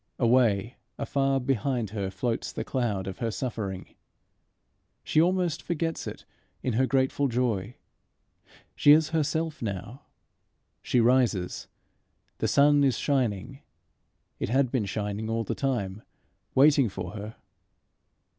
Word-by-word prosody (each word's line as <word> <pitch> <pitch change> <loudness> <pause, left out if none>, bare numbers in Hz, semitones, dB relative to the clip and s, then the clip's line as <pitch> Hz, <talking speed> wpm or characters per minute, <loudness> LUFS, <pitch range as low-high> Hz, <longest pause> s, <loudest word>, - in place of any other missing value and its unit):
Away, 115 -3 +2 0.2
afar 135 -1 0
behind 125 -3 -1
her 100 -3 -3
floats 115 +5 -2
the - - -4
cloud 110 -8 -1
of 95 - -6
her 115 -3 -1
suffering. 110 -5 -4 1.1
She 155 - +3
almost 175 -2 +1
forgets 165 -1 -3
it - - -8 0.4
in 125 - 0
her 130 +4 +2
grateful 135 +1 +1
joy. 115 -4 -1 1.0
She 145 - +7
is 155 0 +4
herself 160 0 -1
now. 105 +4 -5 0.8
She 125 - +1
rises. 115 -7 +2 0.7
The - - +1
sun 145 0 +5
is 135 -3 +2
shining. 130 -2 -1 0.8
It - - -2
had 130 0 +2
been 125 -6 0
shining 105 +2 -3
all 115 0 0
the - - -3
time 110 -7 -2 0.5
waiting 140 -3 +5
for 95 -2 -6
her. 105 +1 -7
125 Hz, 125 wpm, -27 LUFS, 105-140 Hz, 1.1 s, She